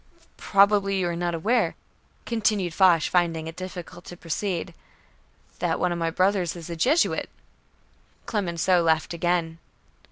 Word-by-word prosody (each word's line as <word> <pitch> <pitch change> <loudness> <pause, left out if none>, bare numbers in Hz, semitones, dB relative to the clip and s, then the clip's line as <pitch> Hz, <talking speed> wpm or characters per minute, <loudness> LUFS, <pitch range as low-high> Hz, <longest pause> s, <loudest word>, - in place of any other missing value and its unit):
"Probably 200 0 +3
you 185 -2 0
are 170 - -3
not 175 0 -2
aware," 225 +9 +1 0.5
continued 210 -6 0
Foch, 175 -3 +4
finding 165 -2 0
it 160 0 -7
difficult 180 -1 -8
to 175 - -10
proceed, 175 +1 -3 0.9
"that - - -1
one 180 - +1
of 170 - -2
my 165 0 0
brothers 185 0 +1
is 170 0 -8
a - - -4
Jesuit." 275 - +1 1.0
Clemenceau 180 -3 +1
laughed 160 0 +1
again. 170 -1 -1
175 Hz, 135 wpm, -25 LUFS, 165-195 Hz, 1.0 s, Foch